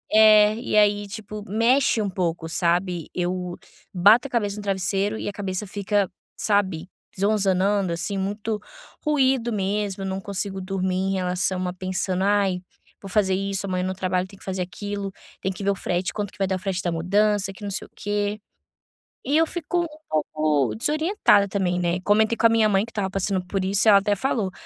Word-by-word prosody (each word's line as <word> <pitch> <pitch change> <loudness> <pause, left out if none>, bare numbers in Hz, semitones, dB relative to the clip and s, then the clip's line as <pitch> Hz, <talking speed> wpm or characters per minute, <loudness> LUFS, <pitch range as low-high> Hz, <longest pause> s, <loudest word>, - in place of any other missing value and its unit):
É, 215 -1 +7
e 235 -2 -1
aí, 205 -1 +3
tipo, 210 0 -7
mexe 230 +4 +3
um 200 - -1
pouco, 170 -3 -2
sabe. 175 0 0
Eu 180 0 -2 0.4
bato 205 +8 +5
a - - -20
cabeça 210 -4 -1
no - - -5
travesseiro 195 +2 0
e - - -5
a 205 - -1
cabeça 195 0 -4
fica, 200 0 0 0.3
sabe, 190 -5 0 0.3
zonzanando, 200 -2 +2
assim, 175 +4 -3
muito 210 +2 -2 0.4
ruído 265 -5 +2
mesmo. 200 -1 -2
Não 190 0 -3
consigo 195 -1 -4
dormir, 185 -1 -2
em 190 +1 0
relação 185 0 -1
a 180 - -3
pensando: 185 0 -2
"Ai, 195 -3 +2 0.4
vou 195 - -8
fazer 190 -1 +2
isso, 195 +1 -1
amanhã 185 -1 -1
no 185 0 -2
trabalho 185 -1 -1
tem 195 +1 -15
que - - -17
fazer 190 -1 -3
aquilo, 200 +2 -4 0.3
tem 190 - -1
que 195 - -7
ver 200 - +2
o - - -1
frete, 180 -1 -2
quanto 205 -2 -3
que - - -19
vai 195 - +1
dar 190 0 0
o - - -9
frete 195 -1 -2
da 175 - 0
mudança 195 +4 +1
que 200 - -13
não 200 - -3
sei 195 - -4
o - - -38
quê." 205 0 -2 0.9
E 285 +4 +2
eu 325 - +5
fico 345 +1 -2
um - - -3 0.2
pouco 155 -6 0
desorientada 305 - +3
também, 185 -3 0
né. 175 0 0
Comentei 220 +4 +3
com 230 - +5
a - - 0
minha 225 -1 +4
mãe 195 0 +3
que 230 - -14
estava 200 -3 -2
passando 195 -1 -1
por 190 +1 -2
isso, 200 +3 +2
e - - +9
ela 200 -1 +8
até 205 +1 +1
falou: 215 -4 -1
195 Hz, 200 wpm, -24 LUFS, 185-210 Hz, 0.9 s, e